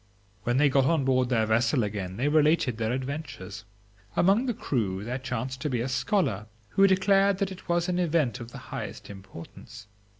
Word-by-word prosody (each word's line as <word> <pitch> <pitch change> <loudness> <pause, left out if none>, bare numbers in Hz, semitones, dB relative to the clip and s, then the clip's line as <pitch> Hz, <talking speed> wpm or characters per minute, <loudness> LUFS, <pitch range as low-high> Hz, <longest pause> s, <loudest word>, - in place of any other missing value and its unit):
When 120 +1 +1
they 145 +1 +5
got 135 -1 +3
on 155 -2 +2
board 130 -1 +2
their 115 -3 +2
vessel 115 +3 +2
again 100 -3 -4
they 130 +5 0
related 150 -5 +2
their 110 0 0
adventures. 130 -6 -5 0.5
Among 200 +8 +3
the 245 - 0
crew 100 - -2
there 125 +4 -3
chanced 130 0 -4
to 150 - -1
be 125 -3 -1
a 120 - -1
scholar, 130 - 0 0.2
who 195 0 +4
declared 195 +1 +3
that 195 -1 -1
it 185 - -11
was 170 +1 +1
an 180 0 0
event 155 -8 +1
of 120 -1 -8
the - - -9 0.2
highest - - -6
importance. 100 +4 -12
130 Hz, 190 wpm, -27 LUFS, 115-165 Hz, 0.5 s, they